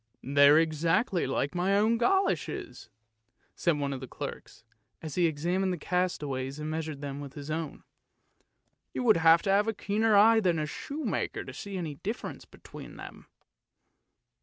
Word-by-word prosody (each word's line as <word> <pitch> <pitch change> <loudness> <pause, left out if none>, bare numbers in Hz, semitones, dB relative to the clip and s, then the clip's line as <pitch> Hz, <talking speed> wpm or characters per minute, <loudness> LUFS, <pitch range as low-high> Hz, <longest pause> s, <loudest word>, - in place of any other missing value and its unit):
" - - -45
They're 140 +2 +6
exactly 165 - +1
like 135 +3 -1
my 185 +3 +1
own 225 +3 +2
goloshes," 385 +9 -1 0.6
said 170 -4 0
one 140 -1 -2
of 135 - -5
the 130 - -8
clerks, - - -8 0.4
as 155 -3 -7
he 175 -2 +3
examined 175 +5 -1
the 180 - -2
castaways 145 -7 -2
and 155 0 -4
measured 155 -2 -4
them 140 -1 -5
with 140 -1 -9
his 145 +1 -7
own. 160 -1 -4 0.5
' - - -46
You - - -1
would 220 -6 +5
have 165 +1 +5
to 195 - +1
have 205 +2 +3
a 225 - -1
keener 215 +1 +1
eye 220 +2 +7
than 180 -5 +1
a 155 - -1
shoe 285 - -6
maker - - -2
to - - -9
see 200 -2 -6
any 165 -5 -4
difference 210 - -6
between - - -12
them! - - -11
165 Hz, 175 wpm, -29 LUFS, 145-200 Hz, 0.6 s, eye